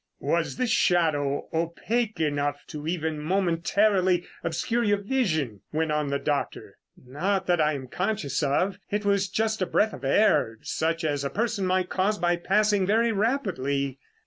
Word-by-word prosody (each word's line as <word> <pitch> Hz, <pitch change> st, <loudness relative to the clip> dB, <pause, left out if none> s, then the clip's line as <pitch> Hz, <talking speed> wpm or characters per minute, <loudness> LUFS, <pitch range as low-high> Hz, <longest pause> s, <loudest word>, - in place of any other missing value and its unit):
"Was -, -, -1 dB
this 250 Hz, -3 st, 0 dB
shadow 150 Hz, -8 st, +2 dB
opaque 190 Hz, +6 st, -1 dB
enough 145 Hz, -2 st, -1 dB
to 150 Hz, -1 st, -6 dB
even 160 Hz, -2 st, -2 dB
momentarily 185 Hz, +2 st, +2 dB, 0.2 s
obscure 200 Hz, +9 st, -1 dB
your 205 Hz, -2 st, +2 dB
vision?" 175 Hz, -, -1 dB
went 160 Hz, 0 st, 0 dB
on 150 Hz, -1 st, 0 dB
the 140 Hz, 0 st, 0 dB
doctor. 145 Hz, 0 st, -3 dB, 0.2 s
"Not 175 Hz, +10 st, -2 dB
that 175 Hz, -2 st, +2 dB
I 155 Hz, 0 st, +2 dB
am 135 Hz, -2 st, -5 dB
conscious 185 Hz, -, -2 dB
of. 180 Hz, +7 st, 0 dB
It 205 Hz, 0 st, -2 dB
was 200 Hz, -1 st, +2 dB
just 220 Hz, -1 st, -1 dB
a 185 Hz, -, +1 dB
breath 215 Hz, +1 st, +2 dB
of 130 Hz, -, -9 dB
air 135 Hz, -, +3 dB
such 165 Hz, +1 st, -1 dB
as 145 Hz, -3 st, -1 dB
a 140 Hz, -, -1 dB
person 220 Hz, -2 st, -1 dB
might 185 Hz, 0 st, +1 dB
cause 200 Hz, +3 st, +1 dB
by 175 Hz, -2 st, +2 dB
passing 205 Hz, +1 st, +2 dB
very 225 Hz, +3 st, +3 dB
rapidly." 140 Hz, -, -1 dB
175 Hz, 160 wpm, -26 LUFS, 150-205 Hz, 0.2 s, air